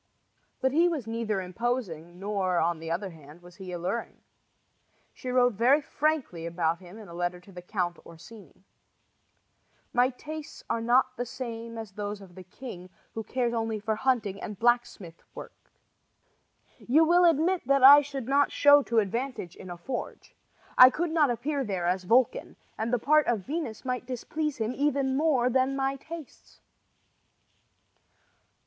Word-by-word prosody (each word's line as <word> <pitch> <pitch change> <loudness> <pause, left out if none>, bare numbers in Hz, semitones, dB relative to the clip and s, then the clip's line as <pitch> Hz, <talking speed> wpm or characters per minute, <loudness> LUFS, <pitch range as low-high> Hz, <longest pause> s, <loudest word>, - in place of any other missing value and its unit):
But 265 - +2
he 330 +5 +4
was 300 -9 -3
neither 225 -3 -2
imposing, 180 -5 -4
nor, 195 -3 -1
on 170 0 +1
the 165 0 -7
other 185 +3 -3
hand, 155 +1 -15
was 175 -1 -15
he 190 -2 -8
alluring. 180 +7 -4 1.0
She 255 - -7
wrote 250 -1 +3
very 245 +8 +4
frankly 280 - -2
about 170 -1 -1
him 185 +2 -13
in 215 -2 -11
a 170 - -11
letter 175 +1 -2
to 180 +3 -17
the 180 -1 -9
Count 180 -2 -3
Orsini: 170 +6 -15 1.3
My 245 +1 +4
tastes 305 +4 -9
are 230 - -1
not 255 +2 +2
the 245 - -2
same 230 -2 -6
as 220 -3 -7
those 205 +1 -5
of 190 -3 -14
the 185 - -11
king, 185 -2 -10 0.2
who 225 - -4
cares 240 +1 -1
only 225 -2 -2
for 215 +1 -1
hunting 220 -5 0
and 210 -3 -6
blacksmith 240 -7 0
work. - - -9 1.3
You 300 +7 +3
will 350 +2 +4
admit 340 +2 +2
that 275 -1 +3
I 285 +2 +10
should 275 -4 -6
not 280 +1 +3
show 290 0 +6
to 235 -4 -2
advantage 225 -3 -2
in 185 - -11
a 175 - -7
forge. 245 +8 -7 0.4
I 255 - +11
could 330 +5 -2
not 310 -4 +3
appear 275 +4 -2
there 190 -6 -3
as 180 +1 0
Vulcan, 240 +5 +2 0.2
and 225 +2 -3
the 245 - +3
part 300 +6 +3
of 220 -6 0
Venus 285 -7 -4
might 250 -1 -3
displease 300 +4 -3
him 225 +1 -2
even 275 -1 0
more 275 -4 +2
than 260 +2 +1
my 270 0 -1
tastes. 315 +1 -11
235 Hz, 165 wpm, -28 LUFS, 190-270 Hz, 1.3 s, I